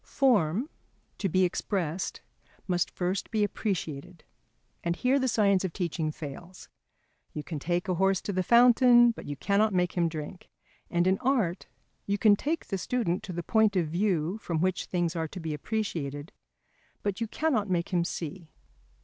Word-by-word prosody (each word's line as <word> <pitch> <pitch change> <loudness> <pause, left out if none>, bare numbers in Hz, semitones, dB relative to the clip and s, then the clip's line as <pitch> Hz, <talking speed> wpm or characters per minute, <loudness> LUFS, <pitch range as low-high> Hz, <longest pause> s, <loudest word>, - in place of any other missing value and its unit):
Form 230 - +2 0.5
to 195 - 0
be 185 +3 +3
expressed 180 -1 -2 0.5
must 180 -2 +1
first 180 +1 -2
be 215 -2 +1
appreciated. 180 -6 -3 0.6
And 170 0 0
here 260 +7 +2
the 260 - +1
science 200 -5 +3
of 185 -3 -3
teaching 165 -4 -2
fails. 165 +5 -9 0.6
"You 150 - -5
can 155 -2 -5
take 175 +5 -1
a 185 - +1
horse 190 +1 +2
to 200 - -4
the 185 - +1
fountain, 240 +2 +6
but - - -10
you 145 - -4
cannot 200 +6 +1
make 180 -1 +2
him 170 -2 +1
drink," 155 +3 -7 0.4
and 175 0 +1
in 190 +1 +2
art 230 -10 0 0.4
you 200 0 +1
can 210 -1 +5
take 310 +9 -2
the 195 - -3
student 190 -4 -1
to 185 - -7
the 175 0 -4
point 220 -1 +3
of 170 -4 +1
view 180 +1 0
from 170 -6 -2
which 185 +1 0
things 175 -2 -1
are 160 -1 -1
to 185 - -8
be 160 -2 -4
appreciated, 150 -4 -3 0.7
but 200 +1 -2
you 230 - 0
cannot 225 -6 0
make 175 -2 0
him 175 -3 +1
see. 170 0 -6
185 Hz, 175 wpm, -28 LUFS, 170-210 Hz, 0.7 s, fountain